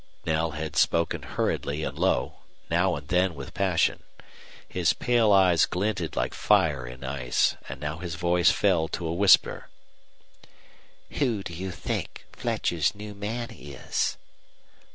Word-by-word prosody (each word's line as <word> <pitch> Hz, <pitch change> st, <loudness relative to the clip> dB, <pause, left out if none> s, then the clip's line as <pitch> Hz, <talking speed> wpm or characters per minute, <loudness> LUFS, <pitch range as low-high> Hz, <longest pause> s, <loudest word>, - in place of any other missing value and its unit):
Knell 80 Hz, 0 st, 0 dB
had 75 Hz, -1 st, -5 dB
spoken 85 Hz, +1 st, +2 dB
hurriedly 75 Hz, +2 st, -2 dB
and -, -, -4 dB
low, -, -, 0 dB, 0.3 s
now 90 Hz, +2 st, +2 dB
and 70 Hz, -1 st, -8 dB
then 90 Hz, +1 st, +1 dB
with 70 Hz, -1 st, -8 dB
passion. 95 Hz, -3 st, +1 dB, 0.7 s
His -, -, +1 dB
pale 120 Hz, -3 st, +2 dB
eyes 95 Hz, -4 st, +5 dB
glinted 95 Hz, -4 st, -2 dB
like -, -, -1 dB
fire 70 Hz, -6 st, +2 dB
in 65 Hz, +2 st, -10 dB
ice, 65 Hz, -2 st, 0 dB
and 65 Hz, 0 st, -7 dB
now 75 Hz, +2 st, -4 dB
his 85 Hz, -2 st, -5 dB
voice 85 Hz, 0 st, +3 dB
fell 90 Hz, -6 st, +2 dB
to 85 Hz, -, -5 dB
a 80 Hz, -, -1 dB
whisper. 95 Hz, +1 st, +4 dB, 1.5 s
"Who 120 Hz, -8 st, +1 dB
do 85 Hz, -, -7 dB
you 95 Hz, +3 st, -5 dB
think 90 Hz, -, -5 dB
Fletcher's 85 Hz, +3 st, -1 dB
new 105 Hz, 0 st, -8 dB
man 110 Hz, +4 st, -4 dB
is?" 70 Hz, -3 st, -3 dB
85 Hz, 140 wpm, -26 LUFS, 75-95 Hz, 1.5 s, eyes